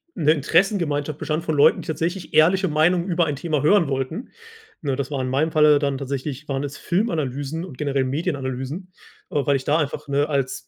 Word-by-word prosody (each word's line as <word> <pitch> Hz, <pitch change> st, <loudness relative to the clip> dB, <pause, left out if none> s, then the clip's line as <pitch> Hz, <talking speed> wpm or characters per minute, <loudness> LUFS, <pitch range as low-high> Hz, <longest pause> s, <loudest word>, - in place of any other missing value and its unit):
'ne 155 Hz, -1 st, +3 dB
Interessengemeinschaft 155 Hz, -2 st, 0 dB
bestand 155 Hz, +1 st, -2 dB
von 155 Hz, -, -1 dB
Leuten, 145 Hz, -, +5 dB
die -, -, -12 dB
tatsächlich 165 Hz, +4 st, -3 dB
ehrliche 185 Hz, +5 st, +4 dB
Meinungen 170 Hz, +4 st, +2 dB
über 175 Hz, -1 st, +2 dB
ein 150 Hz, -2 st, -2 dB
Thema 150 Hz, 0 st, -1 dB
hören 170 Hz, 0 st, +4 dB
wollten. 135 Hz, -, -3 dB, 0.5 s
Ne, 140 Hz, -3 st, -1 dB
das 140 Hz, 0 st, -3 dB
war 135 Hz, -2 st, -1 dB
in 130 Hz, -, -2 dB
meinem 150 Hz, +5 st, +1 dB
Falle 150 Hz, -1 st, +5 dB
dann 140 Hz, -2 st, -1 dB
tatsächlich 140 Hz, +1 st, -5 dB
waren 135 Hz, 0 st, -2 dB
es 145 Hz, 0 st, -6 dB
Filmanalysen 160 Hz, -, -2 dB
und 130 Hz, -8 st, -11 dB
generell 140 Hz, -2 st, 0 dB
Medienanalysen, 140 Hz, +3 st, -3 dB, 0.4 s
äh, 145 Hz, -3 st, 0 dB
weil 140 Hz, -, +3 dB
ich 130 Hz, -, -2 dB
da 150 Hz, +4 st, +2 dB
einfach, 145 Hz, -2 st, -3 dB
ne, 145 Hz, +1 st, +1 dB
als 140 Hz, -3 st, -2 dB
150 Hz, 195 wpm, -22 LUFS, 140-165 Hz, 0.5 s, Leuten